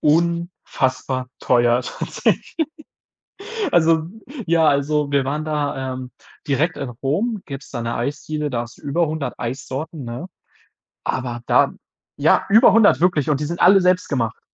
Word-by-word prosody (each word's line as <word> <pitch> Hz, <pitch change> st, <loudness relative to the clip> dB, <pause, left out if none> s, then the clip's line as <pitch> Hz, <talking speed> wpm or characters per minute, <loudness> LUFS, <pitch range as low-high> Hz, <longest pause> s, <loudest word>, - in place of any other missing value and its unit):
unfassbar 150 Hz, -5 st, 0 dB
teuer 120 Hz, 0 st, +3 dB
tatsächlich. -, -, -2 dB, 1.2 s
Also, 160 Hz, -1 st, +3 dB, 0.4 s
ja 165 Hz, -1 st, +3 dB
also 145 Hz, 0 st, +1 dB
wir 140 Hz, -2 st, +2 dB
waren 150 Hz, +3 st, -2 dB
da, 145 Hz, -4 st, -2 dB
ähm, 130 Hz, 0 st, -7 dB, 0.4 s
direkt 150 Hz, +4 st, +1 dB
in 135 Hz, -, -4 dB
Rom, 170 Hz, -, -2 dB
gibt's 135 Hz, -1 st, -8 dB
da 120 Hz, -, -4 dB
'ne 115 Hz, 0 st, -3 dB
Eisdiele, 150 Hz, +4 st, -3 dB
da 120 Hz, -3 st, -1 dB
hast 120 Hz, 0 st, -10 dB
du -, -, -22 dB
über 155 Hz, +4 st, +1 dB
100 155 Hz, -2 st, -4 dB
Eissorten, 135 Hz, +5 st, -5 dB
ne? 120 Hz, +9 st, -6 dB, 0.8 s
Aber 120 Hz, -2 st, -3 dB
da -, -, +4 dB, 0.5 s
ja, -, -, +3 dB
über 220 Hz, +5 st, +7 dB
100 220 Hz, -2 st, +5 dB
wirklich 165 Hz, -5 st, +2 dB
und 145 Hz, -2 st, +1 dB
die 150 Hz, -, -2 dB
sind 170 Hz, +3 st, -4 dB
alle 195 Hz, +2 st, +7 dB
selbst 180 Hz, 0 st, +2 dB
gemacht. 115 Hz, -6 st, -1 dB
145 Hz, 150 wpm, -21 LUFS, 130-165 Hz, 1.2 s, über